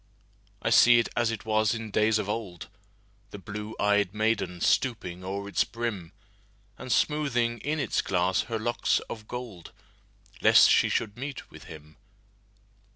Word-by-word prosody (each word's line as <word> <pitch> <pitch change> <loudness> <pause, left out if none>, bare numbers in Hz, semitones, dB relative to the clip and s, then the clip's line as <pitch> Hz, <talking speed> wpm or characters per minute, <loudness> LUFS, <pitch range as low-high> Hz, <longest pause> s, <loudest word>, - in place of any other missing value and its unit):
I 115 - 0
see 120 +2 +7
it 115 - +1
as 120 -1 +1
it 110 -2 -5
was 110 0 +1
in 115 -2 -6
days 110 +1 +2
of 105 -2 -3
old, 95 -8 -5 0.6
The 105 - -9
blue 105 +2 -7
ey'd 105 -1 +1
maiden 110 -5 -1
stooping 95 -6 0
o'er 100 +2 -5
its 100 - +1
brim, 110 -7 -5 0.6
And 130 - -8
smoothing 120 -4 0
in 155 +2 -2
its 135 - 0
glass 90 0 0
her 115 - -1
locks 120 +2 0
of 110 -2 -8
gold, 120 -9 -8 0.7
Lest - - +6
she - - +4
should 105 -1 -2
meet 135 +1 -7
with - - -13
him. 75 -1 -13
110 Hz, 155 wpm, -27 LUFS, 100-120 Hz, 0.7 s, see